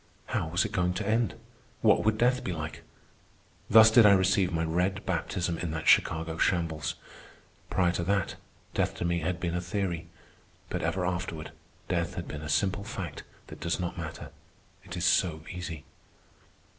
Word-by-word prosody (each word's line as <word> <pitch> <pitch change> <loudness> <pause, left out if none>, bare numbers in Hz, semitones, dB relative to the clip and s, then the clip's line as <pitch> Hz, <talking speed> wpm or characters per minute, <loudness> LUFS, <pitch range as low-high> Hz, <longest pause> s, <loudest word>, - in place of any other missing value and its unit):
How - - -1
was 85 +3 +1
it - - -4
going 90 0 0
to 100 - -3
end? 110 -1 +1 0.5
What - - +4
would 110 0 +2
death 125 +3 +2
be - - -2
like? 80 -2 -5 0.9
Thus 110 0 +8
did 115 +1 +8
I 105 -1 +8
receive 95 -1 +3
my 80 -1 0
red 90 +4 0
baptism 85 -1 -1
in 85 - -2
that 80 0 -4
Chicago 80 0 +3
shambles. 80 -3 0 0.7
Prior 90 -2 +2
to 85 - -2
that, 100 0 +1 0.4
death - - 0
to - - -3
me 85 0 +1
had 85 +2 -2
been 85 -2 -2
a 90 - -1
theory; 90 -2 -2 0.6
but - - -2
ever 90 -1 0
afterward 85 -3 -3 0.4
death 85 0 -1
has 90 -3 -4
been 75 - -6
a 80 - -6
simple 95 +6 +1
fact 95 -6 -6 0.2
that - - -11
does 85 +3 -1
not 90 -1 -3
matter, 80 -2 -7 0.5
it 90 -2 -7
is 90 - -1
so 80 -6 +2
easy. 85 -4 -6
90 Hz, 175 wpm, -29 LUFS, 80-95 Hz, 0.9 s, Thus